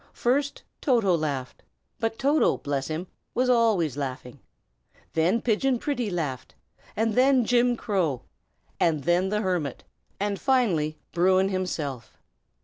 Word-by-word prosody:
First, 275 +3 0 0.2
Toto 230 - +3
laughed 140 -5 -3 0.4
but 225 -1 -1
Toto, 285 +3 +2
bless 140 -2 -3
him! 160 +3 -3 0.3
was 250 +1 +3
always 215 - +2
laughing; 130 -1 -5 0.6
and - - -31
then 175 +8 +2
Pigeon 250 +3 +2
Pretty 245 -4 -2
laughed; 150 -8 -4 0.4
and 225 0 +1
then 255 0 +4
Jim 245 +1 +3
Crow; 175 - -1 0.6
and 155 -4 +2
then 175 +2 +2
the 210 +1 0
hermit; 175 - -2 0.4
and 200 0 -1
finally, 185 - +1
Bruin 185 +2 +3
himself. 155 - -4
190 Hz, 130 wpm, -26 LUFS, 155-240 Hz, 0.6 s, then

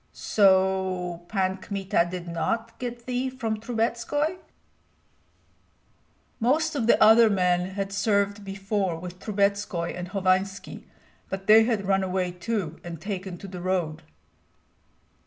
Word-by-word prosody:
"So 190 -3 +2
Pan 190 -2 0
Kmita 190 -3 -1
did 180 -1 -6
not 225 +7 -2
get 240 -1 -6
thee 255 +1 -1
from 225 -4 -3
Trubetskoi?" 240 +8 -1 2.0
"Most 305 +7 +2
of 250 -6 -1
the - - +5
other 225 +1 +7
men 180 -1 +1
had 195 -1 -3
served 200 0 +1
before 195 -2 -2
with 180 +2 -8
Trubetskoi 200 -4 -1
and 180 0 -5
Hovanski, 190 +1 -1 0.4
but 190 0 -5
they 220 +2 +7
had 220 -4 0
run 195 0 +2
away 185 -1 -1
too 180 -3 -3
and 170 -2 -7
taken 190 -1 -5
to 195 - -9
the 180 -2 -7
road." 175 -4 -1
195 Hz, 125 wpm, -26 LUFS, 185-220 Hz, 2.0 s, other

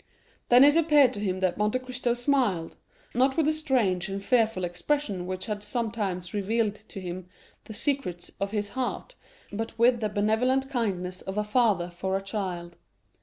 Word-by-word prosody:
Then 245 +2 +8
it 290 +1 +6
appeared 300 -5 +5
to 205 - -5
him 190 -2 -2
that 185 0 0
Monte 210 +4 +2
Cristo 255 -1 -2
smiled, 245 - 0 0.4
not 265 +3 +2
with 320 - +3
the 310 - +3
strange 235 - 0
and 195 0 -4
fearful 220 -5 +2
expression 180 +2 -1
which 185 0 -4
had 210 -1 -3
sometimes 210 -5 -3
revealed 210 +1 0
to 215 -1 -11
him 180 0 -6 0.4
the 220 - -7
secrets 260 - -1
of 200 - -1
his 205 -1 -2
heart, 260 - -4 0.4
but 225 +2 -4
with 235 +1 +4
the 215 -2 -1
benevolent 235 +6 +1
kindness 185 -7 -2
of 190 +2 -6
a 210 - +2
father 210 -6 +2
for 190 +2 -2
a - - -5
child. 180 -4 -4
210 Hz, 170 wpm, -27 LUFS, 190-250 Hz, 0.4 s, Then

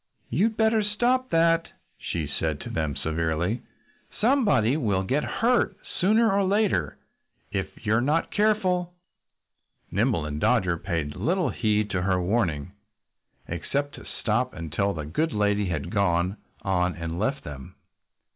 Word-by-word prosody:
"You'd 215 - +1
better 220 0 +3
stop 245 +5 +1
that!" 165 0 +3 0.3
she 80 -3 -3
said 75 +1 -2
to - - -7
them 80 -3 -1
severely. 80 - -1 0.6
"Somebody 210 - +3
will 105 -10 +1
get 135 +10 0
hurt 240 +1 +1 0.2
sooner 220 +4 +4
or 200 0 +2
later 190 - +1 0.5
if 95 +2 -4
you're 110 +2 +3
not 150 +6 +1
careful." 185 -4 +1 1.0
Nimble 100 -3 +1
and 75 0 -4
Dodger 95 -9 +2
paid 80 -6 -2
little 170 - 0
heed 105 -2 0
to 90 -3 0
her 95 0 +1
warning, 90 -5 0 0.8
except 140 - -2
to - - -11 0.2
stop 120 +3 0
until 85 +4 -1
the 75 -2 -5
good 155 - -1
lady 105 -1 +1
had 85 -5 -3
gone 95 -2 +1 0.3
on 90 -2 +1
and 85 0 -4
left 135 +7 -1
them. 65 -3 -9
105 Hz, 135 wpm, -26 LUFS, -, 1.0 s, sooner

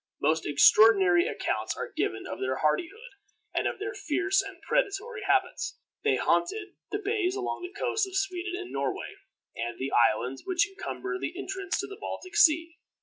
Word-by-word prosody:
Most 160 +2 +1
extraordinary 185 +3 +6
accounts - - -2
are - - -5
given 110 - -1
of - - -6
their 130 0 -1
hardihood, 345 - -1 0.4
and - - +1
of - - -3
their 415 +2 -4
fierce 390 +1 +1
and 390 -3 -9
predatory 455 -1 -1
habits. 390 0 +1 0.3
They - - +3
haunted 400 +3 0 0.2
the 410 - -1
bays 405 -3 0
along 385 -2 -3
the 365 +3 -8
coasts 420 -3 +1
of 380 0 -3
Sweden 370 -1 -2
and 370 -1 -7
Norway, 410 - -3 0.4
and 120 +1 -4
the 135 +1 -3
islands 120 +3 +2
which 370 0 +2
encumber 385 -1 -5
the 355 -1 -4
entrance 385 -1 -3
to - - -4
the 400 0 -9
Baltic 370 +2 -6
Sea. 330 -4 +4
375 Hz, 170 wpm, -28 LUFS, -, 0.4 s, extraordinary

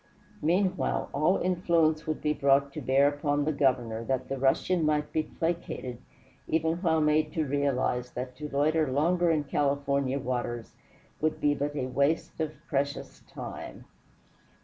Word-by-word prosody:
Meanwhile, 185 +4 +1
all 155 +7 +3
influence 170 -4 +1
would 155 - -3
be 150 0 +2
brought 140 -1 +2
to 155 - -5
bear 135 +2 +4
upon 145 0 0
the 155 - +1
Governor 125 -6 +1
that 130 0 -2
the 135 - -3
Russian 160 +6 +2
might 150 -1 0
be 160 - +2
placated 160 -7 -4 0.5
even 160 +1 +1
while 165 -3 +2
made 150 0 +2
to 160 -2 0
realize 130 -3 0
that 125 0 -5
to 150 0 -6
loiter 150 +1 +1
longer 170 +5 +2
in 155 -2 +2
California 140 -1 0
waters 120 -3 -3 0.5
would 155 0 0
be 145 0 +3
but 145 +1 -3
a 130 - -1
waste 140 +7 0
of 155 -1 -2
precious 140 -2 -2
time. - - -8
145 Hz, 150 wpm, -28 LUFS, 135-155 Hz, 0.5 s, bear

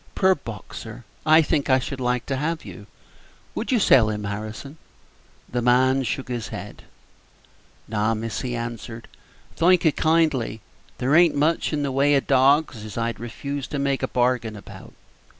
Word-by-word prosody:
"Poor 190 0 +4
Boxer! 115 - -9 0.2
I 155 +1 +7
think 145 -2 0
I 130 - +5
should 130 +1 -5
like 125 -1 -1
to 135 - -2
have 160 +4 -2
you. - - -10 0.7
Would - - -3
you 250 - +4
sell 120 - +5
him, 105 -1 -3
Harrison?" 110 +9 -6 0.7
The 120 - -2
man 130 +2 +3
shook 130 +1 -3
his 120 -3 -4
head. - - -9 1.0
"No, 110 +1 0
miss," 110 0 -4
he 125 -2 -3
answered, 115 -1 -6 0.5
"thank 180 +1 +4
you 160 - +6
kindly; 155 -9 +1 0.4
there 130 +3 0
a'n't 170 -1 +5
much 155 +3 +1
in 150 -2 -1
the 140 - -1
way 140 +2 +3
of 135 - +1
dawgs 135 -2 +3
as 110 -1 -8
I'd 115 -2 -2
refuse 140 +4 -5
to 145 - -4
make 140 -1 0
a 130 - 0
bargain 120 -3 0
about. 100 - -12
130 Hz, 170 wpm, -23 LUFS, 115-145 Hz, 1.0 s, I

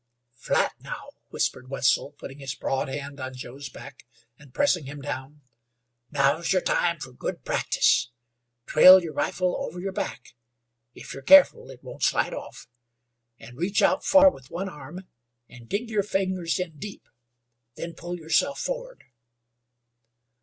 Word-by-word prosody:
"Flat 115 - 0
now," - - -8 0.2
whispered 130 0 -2
Wetzel, 135 +1 +1
putting 140 -1 -10
his 135 -2 -5
broad 135 - -2
hand 140 +1 -6
on 130 0 -6
Joe's 135 +2 -8
back 135 -1 -13 0.3
and 140 0 -18
pressing 180 - +1
him 145 +2 -8
down. 140 +1 -6 0.7
"Now's 145 +3 +1
yer 190 - +4
time 170 -1 +1
fer 135 - -8
good 125 - -6
practice. 120 - +2 0.6
Trail 185 0 +8
yer 165 - -5
rifle 180 -1 -1
over 175 +3 -6
yer 195 +2 -3
back 125 - -5 0.6
if - - -9
yer 135 - -8
careful 285 - +6
it - - -13
won't - - -10
slide - - +1
off - - -9 0.7
an' 120 +1 -13
reach 180 +4 +1
out - - +3
far 285 0 +7
with 130 - -15
one 190 +3 -4
arm 175 +4 -10 0.4
an' 120 -2 -14
dig 215 - -2
yer 210 -2 +2
fingers 190 -3 -1
in 165 -5 -5
deep. 200 +6 -9 0.7
Then 170 0 -6
pull 175 +1 -6
yerself 165 - 0
forrard." - - -5
155 Hz, 150 wpm, -26 LUFS, 135-185 Hz, 0.7 s, Trail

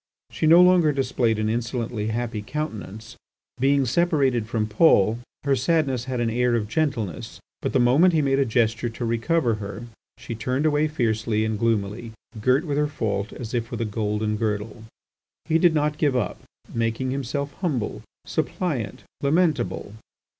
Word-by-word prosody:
She 155 - 0
no 170 +3 +8
longer 180 -4 +5
displayed 125 -4 0
an 110 0 0
insolently 115 -1 -2
happy 110 -1 -2
countenance. 110 - -6 0.4
Being 135 +1 +3
separated 135 -5 +1
from 110 -1 -1
Paul, 110 - +4 0.2
her 140 -1 +2
sadness 135 -3 +1
had 130 -2 -3
an 115 -1 0
air 120 +1 +2
of 110 -3 -1
gentleness. 115 - -2 0.2
But - - -2
the - - +2
moment 145 +9 +4
he 155 - +3
made 135 0 +2
a - - +4
gesture 115 0 +1
to 115 +1 -5
recover 115 +3 +1
her 100 +2 -6 0.3
she - - -7
turned 125 +6 -1
away 150 0 +2
fiercely 110 -6 0
and 110 -1 -2
gloomily, 110 0 -1 0.3
girt 130 +8 +2
with 145 -2 -1
her 150 - +2
fault 105 -7 -2
as 120 -2 -7
if 115 -2 -2
with - - -5
a 115 - 0
golden 105 0 -1
girdle. 110 0 -3 0.6
He 165 0 +2
did 170 -1 +4
not 150 0 0
give 145 -4 +2
up, 125 - -2 0.3
making 115 +3 -1
himself 140 +2 -3
humble, 135 - -2 0.2
suppliant, 135 - -2 0.2
lamentable. 145 - 0
120 Hz, 160 wpm, -24 LUFS, 110-145 Hz, 0.6 s, no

